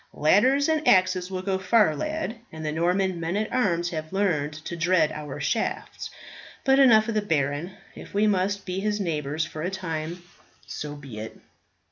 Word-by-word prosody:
"Ladders 255 - +4
and 315 -1 0
axes 185 -1 +4
will 185 -1 -4
go 190 -1 -1
far, 190 -3 +3
lad, 305 - -3
and 160 0 -7
the 150 - -1
Norman 180 +3 +1
men 170 +4 -2
at 215 0 -2
arms 175 -8 +1
have 155 -1 -5
learned 170 -7 0
to 170 - -4
dread 170 -2 +2
our 150 -2 -6
shafts. - - -2 0.5
But 270 0 +4
enough 225 -5 +6
of 230 - -1
the 215 - +1
baron; 155 -1 -1 0.2
if - - -11
we 205 +2 +2
must 200 0 +1
be 185 0 -3
his 210 +1 -1
neighbours 155 -4 -1
for 155 - -7
a 175 - -1
time, 170 -2 -4 0.4
so 150 -1 -6
be 135 -7 -9
it." 110 +1 -8
185 Hz, 180 wpm, -25 LUFS, 155-205 Hz, 0.5 s, enough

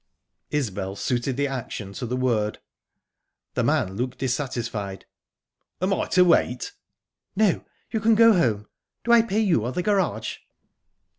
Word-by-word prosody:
Isbel 100 -9 -2
suited 125 +4 -1
the 145 - +1
action 125 -7 -5
to 125 - -5
the 125 +2 -2
word. 115 -5 0 1.0
The 125 - 0
man 120 -8 +1
looked 125 +1 -3
dissatisfied. 120 -7 -3 0.7
"Am 185 +2 +1
I - - -1
to 180 0 +5
wait?" 125 -7 +2 0.6
"No, 205 -3 +2 0.3
you 220 - 0
can 225 +1 +4
go 230 +1 +7
home. 110 - +1 0.4
Do 235 - +1
I 235 -1 +8
pay 220 -1 0
you, 180 - +2
or 120 - -2
the 180 - -1
garage?" 175 - 0
130 Hz, 145 wpm, -24 LUFS, 110-185 Hz, 1.0 s, I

